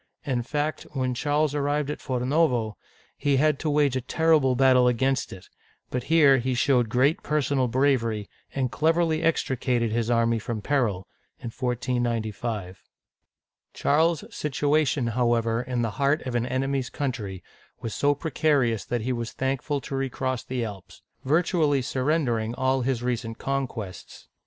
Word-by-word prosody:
In 130 Hz, -4 st, 0 dB
fact, 150 Hz, +5 st, -3 dB
when 130 Hz, -2 st, -1 dB
Charles 145 Hz, +3 st, 0 dB
arrived 145 Hz, 0 st, 0 dB
at -, -, -5 dB
Forno'vo, 125 Hz, -3 st, +1 dB, 0.4 s
he 140 Hz, -2 st, +1 dB
had 150 Hz, 0 st, +2 dB
to 155 Hz, -, -1 dB
wage 145 Hz, -3 st, +2 dB
a 130 Hz, -, 0 dB
terrible 150 Hz, -1 st, +2 dB
battle 130 Hz, -1 st, +5 dB
against 130 Hz, +2 st, +1 dB
it; 95 Hz, -1 st, -11 dB, 0.4 s
but 125 Hz, -1 st, -2 dB
here 145 Hz, -5 st, +5 dB
he 130 Hz, +1 st, -1 dB
showed 125 Hz, -3 st, +2 dB
great 130 Hz, +7 st, +2 dB
personal 140 Hz, -3 st, 0 dB
bravery, 115 Hz, -5 st, +1 dB, 0.3 s
and 130 Hz, -3 st, 0 dB
cleverly 160 Hz, +4 st, +1 dB
extricated 125 Hz, -7 st, 0 dB
his 115 Hz, 0 st, -1 dB
army 115 Hz, -1 st, +2 dB
from 110 Hz, +1 st, -4 dB
peril 105 Hz, -6 st, 0 dB, 0.4 s
(149S). 115 Hz, -5 st, -2 dB, 1.0 s
Charles's 160 Hz, +2 st, +1 dB
situation, 145 Hz, -2 st, +1 dB
however, 115 Hz, -1 st, +1 dB
in 125 Hz, -1 st, -2 dB
the 115 Hz, -, -1 dB
heart 140 Hz, +3 st, +2 dB
of 130 Hz, -, -3 dB
an 120 Hz, 0 st, 0 dB
enemy's 135 Hz, 0 st, -1 dB
country, 105 Hz, -10 st, -4 dB, 0.4 s
was 115 Hz, -, -4 dB
so 145 Hz, 0 st, +2 dB
precarious 140 Hz, -7 st, +1 dB
that 120 Hz, -2 st, -2 dB
he 125 Hz, +3 st, -1 dB
was 120 Hz, -1 st, -4 dB
thankful 135 Hz, +2 st, -1 dB
to 135 Hz, -, -6 dB
re 135 Hz, 0 st, -1 dB
cross 130 Hz, -1 st, -2 dB
the 125 Hz, -2 st, -3 dB
Alps, 95 Hz, -3 st, -10 dB, 0.2 s
virtually 150 Hz, -2 st, +2 dB
surrendering 125 Hz, -4 st, 0 dB
all 130 Hz, 0 st, +1 dB
his 125 Hz, -1 st, -1 dB
recent 115 Hz, -2 st, -2 dB
con 135 Hz, -1 st, -1 dB
quests. 100 Hz, -6 st, -9 dB
130 Hz, 145 wpm, -26 LUFS, 120-145 Hz, 1.0 s, battle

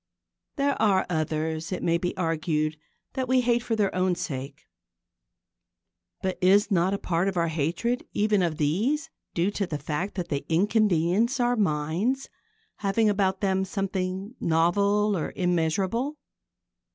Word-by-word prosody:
There 280 Hz, -1 st, 0 dB
are 195 Hz, -3 st, +3 dB
others, 160 Hz, +1 st, -2 dB
it 185 Hz, -, -3 dB
may 170 Hz, 0 st, +2 dB
be 180 Hz, +3 st, -3 dB
argued, 155 Hz, -3 st, 0 dB, 0.4 s
that 260 Hz, -1 st, -2 dB
we 255 Hz, 0 st, +3 dB
hate 240 Hz, -1 st, +2 dB
for 230 Hz, -1 st, -1 dB
their 205 Hz, -3 st, +1 dB
own 185 Hz, 0 st, +1 dB
sake. 135 Hz, -3 st, -6 dB, 1.6 s
But 185 Hz, -1 st, -2 dB
is 200 Hz, +3 st, +4 dB
not 185 Hz, +1 st, +2 dB
a -, -, -2 dB
part 175 Hz, 0 st, 0 dB
of 190 Hz, -2 st, -1 dB
our 170 Hz, -1 st, +2 dB
hatred 170 Hz, -, -1 dB
even 210 Hz, -1 st, +2 dB
of 165 Hz, -3 st, 0 dB
these 245 Hz, -, 0 dB, 0.2 s
due 180 Hz, +4 st, +1 dB
to 200 Hz, -2 st, -2 dB
the 150 Hz, -, -3 dB
fact 150 Hz, +7 st, -3 dB
that 175 Hz, -3 st, -4 dB
they 140 Hz, -2 st, -2 dB
inconvenience 205 Hz, -, +2 dB
our 245 Hz, 0 st, +2 dB
minds, 190 Hz, -, 0 dB, 0.5 s
having 210 Hz, +2 st, +2 dB
about 190 Hz, -2 st, 0 dB
them 190 Hz, -1 st, +1 dB
something 190 Hz, 0 st, -3 dB
novel 200 Hz, +6 st, +2 dB
or 165 Hz, -, -3 dB
immeasurable? 190 Hz, -, 0 dB
190 Hz, 145 wpm, -26 LUFS, 165-210 Hz, 1.6 s, is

